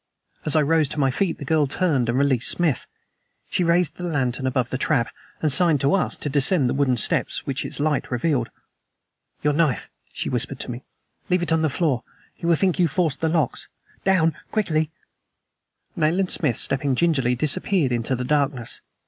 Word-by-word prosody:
As 150 - +2
I 155 - +4
rose 155 -1 +2
to 150 - -4
my 135 -2 +2
feet 175 +5 -1
the 145 - -8
girl 150 0 +2
turned 140 -6 0
and 120 - +1
released 135 -3 +2
Smith. 165 -7 +2 0.6
She 180 - +1
raised 170 -1 +2
the 180 - -4
lantern 130 -3 -1
above 130 -1 -1
the 130 - -1
trap, 130 -6 +1 0.3
and 155 - +2
signed 160 +1 +4
to 140 +5 +2
us 195 - 0
to - - -4
descend 145 +1 +3
the - - 0
wooden 135 -3 +1
steps - - 0
which 135 -1 -2
its - - -5
light 150 -1 0
revealed. 125 -2 0 0.9
"Your 150 0 +2
knife," 155 -3 0 0.2
she - - -4
whispered 125 +2 -1
to - - -3
me. 120 +2 -7 0.5
"Leave 180 -1 +2
it 170 - -2
on 160 0 +3
the 160 - +2
floor. 145 -4 0 0.3
He 170 - -6
will 170 - +5
think 185 +2 +1
you 175 - +4
forced 160 0 -1
the 160 - +1
locks. 155 -6 -1 0.4
Down! 175 -4 +3 0.2
Quickly!" 160 -8 0 1.1
Nayland 175 +3 +1
Smith, 130 -8 0
stepping 135 0 +1
gingerly, 135 -5 +2
disappeared 150 +2 +1
into 120 +2 -1
the 125 0 -4
darkness. 140 -4 -1
145 Hz, 190 wpm, -23 LUFS, 130-165 Hz, 1.1 s, will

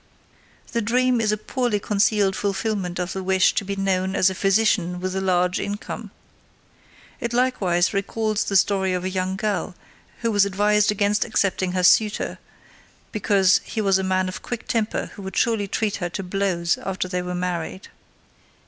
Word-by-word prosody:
The 235 - 0
dream 250 +2 +2
is 215 -1 +2
a 215 - 0
poorly 240 -1 -1
concealed 200 -1 +2
fulfillment 200 -3 -2
of 180 0 -3
the 190 - -4
wish 190 0 +3
to 200 - -1
be 200 0 -4
known 190 -1 0
as 190 -1 +4
a - - -3
physician 195 -2 +1
with 185 +1 -3
a 190 - -1
large 180 -1 +1
income. 205 +1 -5 1.1
It 235 -3 -3
likewise 200 -9 +1
recalls 215 +2 -1
the 200 - -3
story 190 -1 +3
of 180 0 -2
the 185 - -2
young 185 0 -1
girl 200 -3 -2 0.5
who 230 -1 0
was 205 -2 +4
advised 205 +1 +2
against 210 +1 +1
accepting 190 -4 0
her 185 -1 0
suitor 210 +4 +3 0.7
because 195 -3 +3
he 225 - -5
was 195 -2 +3
a - - -2
man 185 0 +1
of 185 - -6
quick 240 -2 -6
temper 225 -2 -1
who 205 - -10
would 190 0 -6
surely 225 -3 +1
treat 210 +1 -1
her 175 -2 -3
to 195 - -5
blows 180 -2 0
after 190 -1 -3
they 180 -1 -2
were 180 0 -4
married. 180 +1 -4
195 Hz, 175 wpm, -23 LUFS, 185-210 Hz, 1.1 s, as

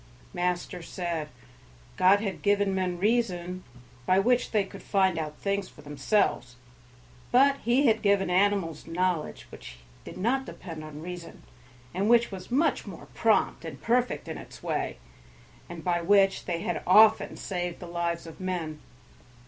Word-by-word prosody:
Master 180 0 -2
said, 165 -2 -4 0.7
God 190 +2 +5
had 195 -5 -4
given 205 -1 +2
men 185 -2 -1
reason, 185 -4 0 0.4
by 185 - +4
which 245 +5 +2
they 210 -3 +2
could 195 0 -11
find 190 -4 +1
out 150 -1 -5
things 200 -1 -2
for 150 - -16
themselves; 145 - 0 0.8
but 275 +3 +5
he 250 +4 +2
had 220 -3 +3
given 200 -1 +3
animals 180 -4 +1
knowledge 175 -1 -1
which - - -11 0.3
did - - -9
not 245 +8 +1
depend 160 -4 -8
on 155 0 -9
reason, 175 -1 -8 0.5
and 195 +4 0
which 235 -1 +4
was 185 -1 -8
much 285 +7 +1
more - - -10
prompt - - +2
and - - -7
perfect 245 +2 0
in - - -5
its - - -12
way, - - -2 0.7
and 170 -2 -8
by 175 -1 +1
which 195 +2 +3
they 170 -2 -2
had 175 - -2
often 215 +4 +5
saved 175 -2 -4
the - - -8
lives 170 0 -3
of 165 - -11
men. 175 -5 -3
185 Hz, 155 wpm, -27 LUFS, 170-205 Hz, 0.8 s, God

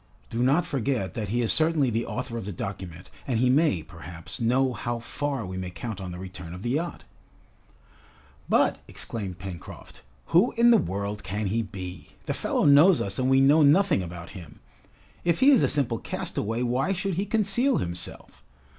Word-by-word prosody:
Do 115 - -2
not 140 +7 +3
forget 125 -6 -1
that 105 -4 -4
he 120 +3 0
is 115 - +3
certainly 155 -5 +2
the 115 +1 -1
author 125 -1 -4
of 115 - -4
the 105 - -4
document, 90 -1 -7 0.2
and 125 -4 0
he 125 +2 +3
may, 145 - +2
perhaps, 85 +3 -9
know 125 +3 +2
how 120 0 -3
far 135 +1 -3
we 95 0 -6
may 90 -1 -4
count 100 +3 -6
on 90 -1 -5
the 90 - -7
return 90 -2 -8
of 90 - -9
the 120 - -1
yacht!" 165 +5 -2 1.5
"But!" - - +3
exclaimed 100 -6 -3
Pencroft, 90 -2 -9 0.3
"who 180 +9 +5
in 235 0 +5
the 230 - +6
world 100 - -3
can 105 +3 -3
he 110 +4 0
be? 95 -4 -8
The - - -1
fellow - - 0
knows 150 +5 +7
us 100 +3 -3
and 130 0 +1
we 135 0 +5
know 145 +4 +5
nothing 155 - +4
about 85 -1 -8
him! 85 -6 -11 0.6
If 170 -1 +1
he 275 +2 +7
is 265 - +5
a - - +4
simple 130 -6 0
castaway, 115 +3 -3
why 125 +10 +1
should 195 +1 -2
he 190 +4 -1
conceal 225 +5 +1
himself! 85 0 -6
115 Hz, 190 wpm, -26 LUFS, 95-145 Hz, 1.5 s, knows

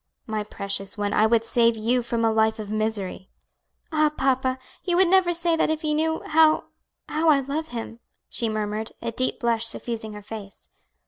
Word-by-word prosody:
"My 215 -1 -2
precious 200 -1 -4
one, 205 0 -1
I 215 - +4
would 230 0 +2
save 230 -1 +3
you 240 +3 +1
from 230 -1 -1
a 225 - +3
life 220 0 +2
of 210 -1 -6
misery." 215 -3 -2 0.6
"Ah, 310 -1 +3
papa! 265 -3 0 0.3
you 350 -2 +1
would 375 0 +6
never 370 -1 +4
say 340 -1 +1
that 325 - +1
if 315 0 -1
you 305 -1 +1
knew 320 +1 0
how 315 0 +4 0.4
how 315 +1 +1
I 285 -3 +5
love 290 +4 -3
him," 230 -3 -6 0.3
she 230 - -2
murmured, 215 0 -3
a 230 - -2
deep 255 +3 -1
blush 230 -1 +1
suffusing 225 -2 -4
her 210 0 -9
face. 205 -2 -10
235 Hz, 190 wpm, -25 LUFS, 215-305 Hz, 0.6 s, would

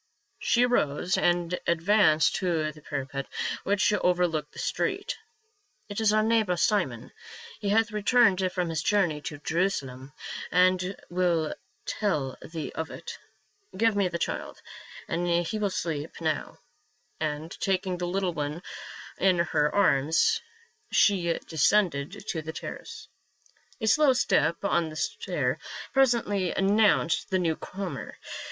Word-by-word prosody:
She 240 +1 +3
arose 180 -6 +1
and 175 0 +1
advanced 170 -1 +4
to 165 -4 0
the 155 0 -16
parapet 140 -1 -4 0.4
which 200 +1 +2
over 180 -3 +2
looked 155 -3 -4
the - - -15
street. - - -2 0.4
" 410 - -42
It 205 +2 -3
is 215 -1 +4
our 215 0 +3
neighbor, 220 -5 +2
Simon; 170 - 0 0.5
he 200 - -2
hath 225 +2 +3
returned 210 -3 +3
from 180 -2 -1
his 160 -2 -1
journey 175 -4 +1
to 145 - -6
Jerusalem 145 -5 -2 0.4
and 185 +2 +3 0.2
will 175 -3 +1 0.3
tell 150 -11 -1
thee 160 -2 -6
of 160 0 -4
it. 470 0 -8 0.6
Give 225 +1 +3
me 200 -2 +2
the 170 -1 -3
child; - - -4 0.5
he 175 +4 0
will 205 -1 +1
sleep 160 -5 -4
now," 160 -2 -2 0.6
and 155 +1 -3
taking 185 -2 0
the 175 - -2
little 185 0 -1
one 150 +2 -4 0.6
in 185 -2 +4
her 155 -3 +1
arms 185 - +3 0.5
she 180 -5 +3
de 165 - -9
scended 180 +2 +2
to 165 -6 -3
the 160 +1 -6
terrace. - - -8 0.7
A 220 - -2
slow 280 +5 +5
step 170 - +1
on 170 -4 +1
the 155 - -9
stair 150 -4 -2 0.3
presently 235 -8 +2
announced 200 -4 +3
the 190 - +2
new 165 -3 +1
comer. 185 -7 -6
180 Hz, 135 wpm, -27 LUFS, 155-205 Hz, 0.7 s, slow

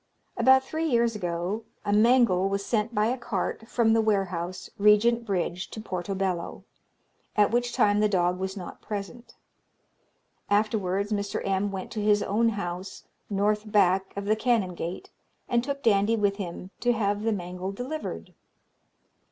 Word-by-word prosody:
"About 265 0 +5
three 315 +4 -2
years 235 -4 +2
ago 180 +3 -3 0.2
a 205 - +1
mangle 215 -4 +4
was 200 0 -2
sent 225 0 -1
by 210 0 +3
a 245 +3 0
cart 225 0 -3
from 230 -2 +2
the 225 - +4
warehouse, 185 -4 -1
Regent 230 +3 +4
Bridge, 180 -1 -2
to - - -8
Portobello, 190 -3 -3 0.7
at 210 0 +4
which 240 +1 +1
time 210 -4 +3
the 210 0 +3
dog 180 -2 +1
was 190 +1 -3
not 180 - -8
present. 210 +3 -7 1.1
Afterwards, 205 -1 +1
Mr. 205 -1 -2
M. 195 +1 +1
went 190 -1 -6
to 215 - -3
his 205 0 +3
own 225 +3 +2
house, 185 -3 -5 0.3
North 210 +1 0
Back 190 -2 +3
of 200 - -3
the 215 +1 +3
Canongate, 190 -7 -1 0.4
and 235 -1 +1
took 280 +1 -4
Dandie 210 0 +3
with 205 -2 +1
him, 185 -1 -6
to 245 0 +2
have 205 -2 0
the 225 +1 0
mangle 180 -1 -4
delivered. 260 +9 -6
205 Hz, 150 wpm, -27 LUFS, 190-225 Hz, 1.1 s, About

